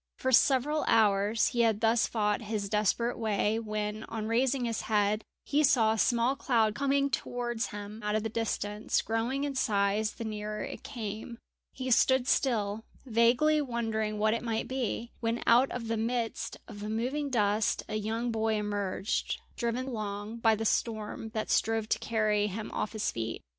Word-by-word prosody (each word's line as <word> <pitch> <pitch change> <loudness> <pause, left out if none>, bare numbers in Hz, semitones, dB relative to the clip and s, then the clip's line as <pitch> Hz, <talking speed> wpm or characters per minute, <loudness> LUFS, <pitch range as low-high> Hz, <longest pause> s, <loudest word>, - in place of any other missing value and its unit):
For 260 - -1
several 280 +4 +4
hours 210 0 +3
he 240 - -3
had 225 -3 +3
thus 225 0 +3
fought 210 -2 0
his 210 -2 -3
desperate 215 +3 +1
way, 215 0 +1
when, 215 -1 -3
on 220 -2 -5
raising 245 +3 +1
his 230 -1 -2
head, 210 0 +2 0.2
he 295 +1 +2
saw 230 -6 +4
a - - -3
small 240 +3 +2
cloud 230 -6 +2
coming 280 +2 +1
towards 240 -2 -2
him 205 +2 -8
out 210 0 -1
of 215 - 0
the - - 0
distance, 215 -1 -1
growing 235 +5 -1
in 285 -1 -2
size 210 -3 +1
the - - -7
nearer 210 0 -4
it - - -7
came. 225 -2 -6 0.3
He 260 -1 -4
stood 260 +1 +4
still, 220 -6 +1 0.2
vaguely 250 +6 +3
wondering 225 -5 -2
what 215 +1 +2
it 230 - -1
might 225 -2 -2
be, 245 -2 -3
when 230 0 -1
out 245 +3 +5
of 240 -2 -5
the 225 0 -1
midst 230 0 -2
of 205 -3 -9
the 210 +1 -5
moving 260 +7 -1
dust 210 -3 +1
a - - -6
young 225 +3 -1
boy 220 0 0
emerged, 205 -1 -2 0.2
driven 235 +2 -1
along 215 -2 -4
by 225 -1 +3
the 225 +1 -3
storm 220 0 -1
that 215 - -2
strove 225 -1 +1
to - - +1
carry 215 -2 +1
him 210 +2 -5
off 210 - -3
his 220 - -1
feet. 115 0 -4
225 Hz, 175 wpm, -30 LUFS, 210-240 Hz, 0.3 s, out